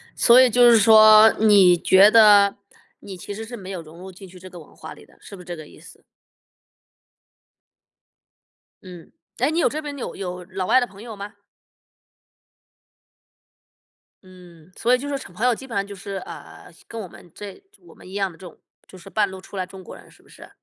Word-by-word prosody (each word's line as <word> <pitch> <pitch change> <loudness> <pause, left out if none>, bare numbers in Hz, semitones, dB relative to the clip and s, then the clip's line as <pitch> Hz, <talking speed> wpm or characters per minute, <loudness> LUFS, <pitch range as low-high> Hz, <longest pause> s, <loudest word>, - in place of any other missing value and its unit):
所 245 +1 +5
以 255 - +4
就 245 +1 +4
是 235 - +5
说， 215 0 +6
你 200 -5 +4
觉 190 +4 +4
得， 205 -3 +5 0.4
你 195 -2 -11
其 195 +3 -9
实 220 +2 -8
是 240 +2 -10
没 190 -4 -11
有 180 -3 -7
融 160 +1 -16
入 190 +1 -11
进 190 +1 -15
去 180 0 -16
这 185 +1 -13
个 180 -1 -13
文 155 - -18
化 - - -11
里 - - -18
的， - - -26
是 - - -15
不 185 - -14
是 - - -16
这 175 -1 -8
个 155 -2 -12
意 - - -18
思？ - - -17 2.8
嗯， 180 -3 -14 0.3
哎， 255 +4 0
你 325 - -2
有 - - +2
这 310 - -5
边 290 -2 -8
有 260 - -7
有 180 -2 -7
老 185 +1 -6
外 255 - +3
的 245 - -3
朋 200 -1 -16
友 230 -2 -10
吗？ 205 +1 -10 2.9
嗯， 180 -3 -18
所 245 +2 0
以 - - +3
就 275 +3 -8
说 285 -1 -4 0.2
朋 215 +7 -4
友 250 -2 +2
基 265 - -12
本 255 - -12
上 200 - -2
就 200 0 -11
是， 195 +1 -9
呃， - - -13 0.2
跟 230 - -8
我 205 - -8
们 175 0 -18
这 205 - -11 0.2
我 350 - -20
们 - - -17
一 - - -13
样 195 -1 -2
的 165 - -17
这 185 - -14
种， 175 - -14 0.3
就 185 - -16
是 185 +2 -15
半 205 0 -1
路 190 0 -11
出 190 - -15
来 185 -1 -4
中 190 +1 -14
国 185 - -13
人 - - -18
是 - - -24
不 - - -27
是？ - - -16
200 Hz, 235 characters per minute, -21 LUFS, 185-225 Hz, 2.9 s, 说